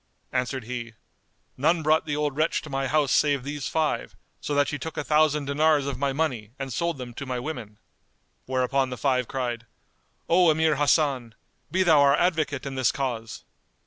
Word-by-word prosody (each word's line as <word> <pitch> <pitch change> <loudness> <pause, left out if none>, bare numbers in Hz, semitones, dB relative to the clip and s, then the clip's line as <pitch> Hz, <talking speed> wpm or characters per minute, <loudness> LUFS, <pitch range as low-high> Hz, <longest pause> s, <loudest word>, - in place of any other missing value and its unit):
Answered 130 +1 -2
he, 115 -1 -6 0.6
"None 160 +5 +2
brought 155 +1 +2
the 145 - -1
old 150 -2 -1
wretch 155 +2 0
to 155 - -9
my 135 0 -1
house 145 0 +2
save 145 -3 +3
these 145 0 -4
five, 160 -2 -1 0.2
so 145 - -3
that 145 -1 +3
she 145 - -3
took 160 +4 -6
a - - -1
thousand 150 -1 +2
dinars 145 0 +2
of 140 -2 -4
my 140 0 +1
money 125 -7 -2
and 135 -2 -5
sold 170 +5 -1
them 125 -2 -7
to 140 - -6
my 125 -1 -2
women." 120 -7 -6 0.7
Whereupon 130 +1 +1
the 125 - -5
five 125 -3 +1
cried, 120 -3 -3 0.6
"O 175 0 +5
Emir 160 -1 +2
Hasan, 140 -5 +1 0.3
be 185 +4 +2
thou 160 -4 +5
our 140 0 +5
advocate 155 -5 0
in 140 - -4
this 130 -2 +2
cause." 120 -5 -4
140 Hz, 185 wpm, -25 LUFS, 130-155 Hz, 0.7 s, O